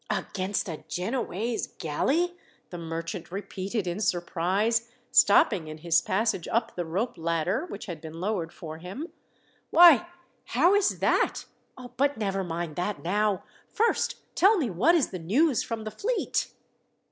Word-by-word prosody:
"Against 190 +1 -2
a 160 -4 -6
Genoese 225 +2 -2
galley!" 300 - 0 0.4
the 175 - -6
merchant 165 +1 -5
repeated 195 +1 -4
in 175 +2 -3
surprise, 195 +5 0 0.2
stopping 200 -4 +5
in 155 0 -7
his 165 +1 +2
passage 205 -2 0
up 230 0 -1
the 175 - -2
rope 190 +5 -2
ladder, 170 - -1
which - - -7
had 170 -6 -7
been 160 0 -8
lowered 180 -4 -2
for 160 -1 -8
him. 195 - -7 0.6
"Why, 345 -2 +7 0.4
how 355 +3 +3
is 405 -1 +2
that? - - +1 0.5
But 280 0 +2
never 195 -3 -1
mind 170 -2 -4
that 190 +3 -2
now. 205 +2 +1 0.3
First 460 0 +1 0.2
tell 400 +4 +5
me 265 - 0
what 245 - +4
is 320 - +2
the 185 - -5
news 240 - +2
from 225 -2 -4
the 215 - -5
fleet?" 470 - -1
200 Hz, 145 wpm, -27 LUFS, 170-240 Hz, 0.6 s, Why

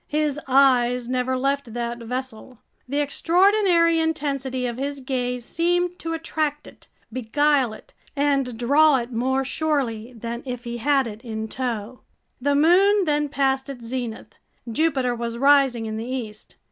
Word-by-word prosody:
His 300 -1 0
eyes 250 -2 +3
never 255 +1 0
left 275 -2 -1
that 235 0 -3
vessel. 250 0 -6 0.3
The 285 +2 0
extraordinary 340 +2 +3
intensity 275 -5 -1
of 240 -1 -3
his 280 +1 -3
gaze 250 -2 -3
seemed 350 +3 0
to 330 0 -4
attract 310 -2 -2
it, - - -16 0.3
beguile 265 +1 +1
it, - - -14 0.2
and 275 -4 0
draw 285 +4 +4
it 240 0 -5
more 265 +3 0
surely 255 -6 -1
than 235 +1 -6
if 250 -2 -6
he 240 -1 -5
had 275 +2 +2
it 220 -1 -8
in 220 -2 -4
tow! 240 -1 -4 0.4
The 285 +2 +2
moon 375 +6 +4
then 295 -1 0
passed 270 -1 0
its 245 -4 -8
zenith. 230 -3 -5 0.3
Jupiter 265 -1 +1
was 235 0 -4
rising 270 -3 +4
in 220 0 -4
the 225 - -4
east. 230 -5 -6
265 Hz, 150 wpm, -23 LUFS, 240-295 Hz, 0.4 s, draw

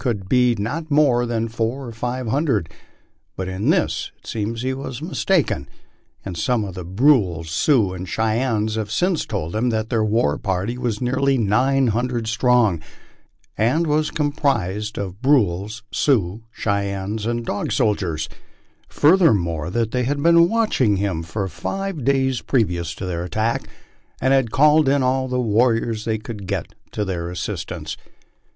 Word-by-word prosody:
d 125 0 +4
not 145 +11 -3
be 145 - +1
more 125 -5 +3
than 115 -1 -1
four 115 +4 -2
or 120 - -7
five 120 +2 -4
hundred, 125 - +1 0.7
but 95 - -4
in 95 +2 -1
this - - +1
it - - -27
seems 115 +2 -3
he 130 0 0
was 130 -2 -6
mistaken, 160 - 0 0.6
as 90 -4 -4
some 120 0 +1
of 95 - -6
the 90 0 -6
Brules, 95 - +2
Sioux, 105 - +2
and 90 0 -6
Cheyennes 110 -1 0
have 110 -2 -3
since 175 - 0
told 95 -4 -3
him 120 +3 +1
that 110 -1 -2
their 115 -2 +2
war 105 -9 +1
party 95 +4 -2
was 120 -4 -2
nearly 130 +2 +1
nine 130 +5 +2
hundred 120 +1 -1
strong, 115 -6 +2 0.7
and 125 +10 +2
was 155 0 +1
composed 110 - -1
of 100 +1 -5
Brules, 110 -5 +1
Sioux, 110 -5 +1
Cheyennes, 100 +1 -2
and 120 0 -2
Dog 100 - -2
Soldiers; 85 -7 0 0.6
furthermore, 100 - +3
that 115 +2 -1
they 125 -1 0
had 140 +2 -1
been 170 0 +6
watching 185 - +2
him 95 -4 -1
for 95 +4 -3
five 195 - -4
days 130 -1 +1
previous 90 - 0
to 95 - -6
their 85 -2 -3
attack, 110 +6 -1 0.5
and 130 - +2
had 135 -4 +3
called 150 +3 +4
in 140 -1 +2
all 130 +1 +1
the 125 0 -1
warriors 115 -1 +1
they 110 -1 0
could 105 -3 -8
get 95 -4 -3 0.2
to 105 - -3
their 85 -3 -3
assistance. 90 - -5
115 Hz, 160 wpm, -21 LUFS, 100-130 Hz, 0.7 s, been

